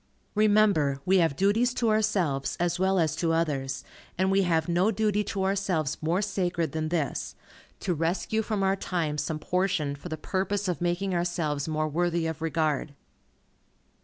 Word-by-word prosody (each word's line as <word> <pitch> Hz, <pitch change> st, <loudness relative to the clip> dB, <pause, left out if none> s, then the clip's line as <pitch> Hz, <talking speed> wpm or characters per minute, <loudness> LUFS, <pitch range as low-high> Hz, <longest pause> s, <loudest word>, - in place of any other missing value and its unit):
Remember, 205 Hz, -10 st, +3 dB
we 190 Hz, +1 st, +4 dB
have 165 Hz, -5 st, +2 dB
duties 220 Hz, -, +2 dB
to 230 Hz, -3 st, +2 dB
ourselves, 190 Hz, -11 st, 0 dB
as 175 Hz, 0 st, 0 dB
well 190 Hz, +1 st, +2 dB
as 160 Hz, -3 st, +1 dB
to 165 Hz, -1 st, +1 dB
others, 145 Hz, -5 st, -1 dB, 0.3 s
and 190 Hz, +1 st, +2 dB
we 195 Hz, 0 st, +4 dB
have 165 Hz, -3 st, +1 dB
no 175 Hz, +4 st, +2 dB
duty 210 Hz, -1 st, +1 dB
to 195 Hz, -1 st, -2 dB
ourselves 190 Hz, -6 st, 0 dB
more 170 Hz, +6 st, +1 dB
sacred 180 Hz, -4 st, -1 dB
than 155 Hz, 0 st, -2 dB
this, 160 Hz, -4 st, -2 dB, 0.5 s
to 185 Hz, -, 0 dB
rescue 170 Hz, +7 st, 0 dB
from 210 Hz, -2 st, -1 dB
our 195 Hz, 0 st, +3 dB
time 165 Hz, -6 st, -2 dB
some 150 Hz, +2 st, -2 dB
portion 175 Hz, -3 st, 0 dB
for 145 Hz, +5 st, -9 dB
the 155 Hz, -, -4 dB
purpose 195 Hz, +4 st, -1 dB
of 180 Hz, -1 st, -2 dB
making 175 Hz, +2 st, 0 dB
ourselves 165 Hz, -5 st, -1 dB
more 155 Hz, 0 st, 0 dB
worthy 170 Hz, +2 st, 0 dB
of 160 Hz, 0 st, -4 dB
regard. 155 Hz, -3 st, -1 dB
175 Hz, 165 wpm, -27 LUFS, 155-195 Hz, 0.5 s, we